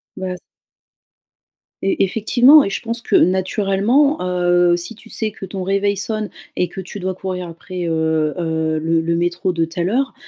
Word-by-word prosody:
Bah, 185 -1 -4
c - - -12 1.4
Et 195 - +2
effectivement 245 +9 +5
et 195 - -2
je - - -3
pense 230 +1 -4
que - - 0
naturellement, 200 - +2
heu, 175 -1 +3
si 175 +6 -6
tu 225 +1 -17
sais 220 - -2
que 195 - -8
ton 190 0 -6
réveil 200 +2 +1
sonne 215 +1 -3 0.3
et 180 - 0
que 185 +2 -7
tu 190 +3 -8
dois 185 0 -2
courir 185 -1 -5
après, 175 +2 -6
heu 160 -2 0
heu, 160 -2 -1
le 165 +1 +1
le 165 +1 0
métro 175 +2 -1
de 165 -1 0
telle 170 +2 -2
heure, 265 +3 0
185 Hz, 180 wpm, -19 LUFS, 170-205 Hz, 1.4 s, effectivement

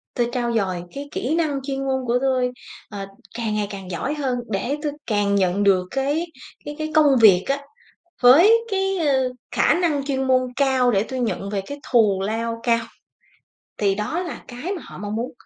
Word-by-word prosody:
tôi 240 -1 +1
trau 240 -1 -1
dồi 185 -5 -1
cái 285 +1 -6
kỹ 275 +7 -1
năng 310 -4 0
chuyên 270 0 -3
môn 265 -1 -1
của 240 +1 +2
tôi, 255 -2 +1 0.4
ờ, 200 -2 -6 0.3
càng 220 -2 -2
ngày 210 -1 -1
càng 195 -2 -8
giỏi 180 - -2
hơn 270 -4 -1
để 230 +7 -1
tôi 300 - -1 0.2
càng 205 -2 +1
nhận 190 0 +1
được 190 -2 +3
cái 285 +5 0 0.4
cái 295 - -6
cái 310 0 -3
công 295 -3 +5
việc 190 -4 +7
á, 275 +1 0 0.6
với 300 - +8 0.2
cái, 385 -1 0
ơ, 270 -5 +2 0.2
khả - - +3
năng 325 -6 0
chuyên 265 -1 -1
môn 260 -1 +4 0.2
cao 265 -3 +3
để 195 -4 +2
tôi 260 -1 -3
nhận 210 -4 -2
về 205 -1 -1
cái 285 - -7
thù 210 -5 +4
lao 230 +2 -2
cao." 230 -1 +2 0.9
Thì 200 -2 +2
đó 210 - -2
là 350 - -7
cái 255 +10 -5
mà 340 - -8
họ - - -11
mong 205 +1 -4
muốn 235 +3 -3
250 Hz, 200 wpm, -22 LUFS, 210-285 Hz, 0.9 s, với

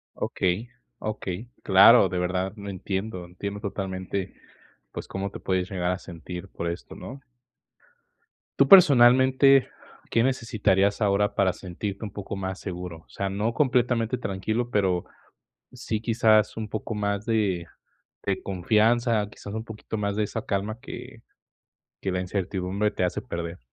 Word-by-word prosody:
Okey, 95 +6 -1 0.3
okey, 105 0 -4
claro, 100 +2 +7
de 90 0 -3
verdad, 90 +1 -1
lo 100 -1 -8
entiendo, 95 0 -4
entiendo 100 +4 -6
totalmente, 95 -2 -4 0.6
pues, - - -6
cómo 95 +1 -3
te - - -8
puedes 95 -1 -1
llegar 90 -2 -1
a 90 - -3
sentir 90 +1 -8
por 85 - -4
esto, 85 - -7
¿no? 135 +3 -9 1.4
Tú, 140 - +5
personalmente, 130 -4 +7 0.4
¿qué 115 - +3
necesitarías 105 -6 +1
ahora 105 0 +2
para 95 -2 +3
sentirte 100 +3 -6
un 105 - -5
poco 100 0 -6
más 95 0 -4
seguro? 90 -3 -6
O - - -42
sea, 100 - -3
no 105 +4 -1
completamente 125 -3 +1
tranquilo, 110 +5 -2
pero 95 -5 +1 0.7
sí, 115 -4 -4
quizás, 110 -2 +3
un 110 -1 -3
poco 110 +2 -4
más 100 0 -1
de 100 -7 0 0.6
de 100 -1 -1
confianza, 110 +3 +2
quizás, 100 -1 -10
un 110 0 -4
poquito 110 -1 -7
más 100 -1 -1
de 110 - +1
esa 110 +2 -4
calma 105 +2 -2
que 125 -1 -9 0.8
que 95 - -2
la 90 - -1
incertidumbre 95 +2 -1
te 95 - -1
hace 90 - -1
perder. 85 0 -5
100 Hz, 145 wpm, -26 LUFS, 95-110 Hz, 1.4 s, claro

